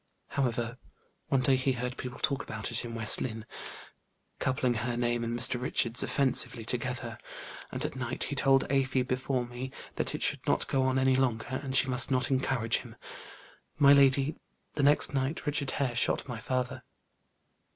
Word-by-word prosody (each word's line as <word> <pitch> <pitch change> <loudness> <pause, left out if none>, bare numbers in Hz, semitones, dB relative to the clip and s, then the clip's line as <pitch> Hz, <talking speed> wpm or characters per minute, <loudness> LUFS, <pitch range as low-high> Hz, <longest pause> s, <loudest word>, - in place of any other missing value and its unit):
However, 120 -3 -2 0.5
one 135 - +2
day 130 +1 +4
he 130 +1 0
heard 125 +1 -4
people 125 -1 -7
talk 140 - 0
about 110 +2 -5
it 115 - -2
in 115 -1 -6
West 110 -1 +5
Lynne, 110 -3 -4 0.9
coupling 130 -1 0
her 120 +2 -3
name 120 -1 0
and 115 +1 -2
Mr. 120 0 +5
Richard's 120 -1 0
offensively 130 -4 0
together, 120 -1 -2 0.5
and - - -2
at - - -4
night 130 -1 -3
he 145 - -3
told 135 0 +3
Afy, 135 -1 +1
before 130 0 -2
me, 120 +2 -6 0.3
that - - -1
it - - -2
should - - +1
not - - +2
go 135 - +1
on 130 0 +1
any 130 0 +3
longer, 130 -1 -1
and 135 -2 -4
she 135 - +5
must 130 0 +2
not 130 0 +1
encourage 130 -3 +1
him. - - -10 0.8
My 140 -1 +7
lady, 140 +1 +4 0.4
the 150 - -2
next 145 +1 +4
night 135 +3 -2
Richard 145 -2 -1
Hare 130 -4 -1
shot 125 - +1
my 120 -3 -5
father." 130 +2 -3
130 Hz, 175 wpm, -29 LUFS, 120-135 Hz, 0.9 s, My